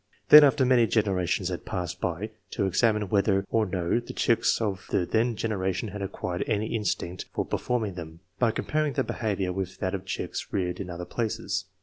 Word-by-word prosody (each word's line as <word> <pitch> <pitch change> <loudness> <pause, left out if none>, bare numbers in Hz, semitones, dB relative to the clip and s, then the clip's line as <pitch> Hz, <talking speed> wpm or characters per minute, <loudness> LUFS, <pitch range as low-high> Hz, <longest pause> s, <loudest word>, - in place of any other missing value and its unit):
Then, 150 0 +11
after 135 -2 +4
many 125 -2 +4
generations 95 -7 +1
had - - -4
passed 90 -3 -4
by, 90 +6 -2 0.2
to 100 - -1
examine 105 +1 +2
whether 100 -1 +2
or 110 -2 +2
no 90 +3 0
the 120 - -8
chicks 115 - +2
of 100 -5 -2
the 90 - +1
then 115 +5 +1
generation 95 -2 -2
had 105 0 -7
acquired 90 -2 -3
any 110 0 -1
instinct 95 -5 -2
for - - -1
performing 115 -5 -1
them, 85 -2 -9 0.2
by 120 - +4
compar 155 +6 -1
ing 145 - -3
their 135 - +1
behaviour 100 -7 -2
with 95 -1 -4
that 95 +1 -2
of 95 -1 -4
chicks 95 - -4
reared 90 -3 -1
in 95 -2 -5
other 90 0 -5
places. 110 +4 -2
100 Hz, 195 wpm, -27 LUFS, 90-115 Hz, 0.2 s, Then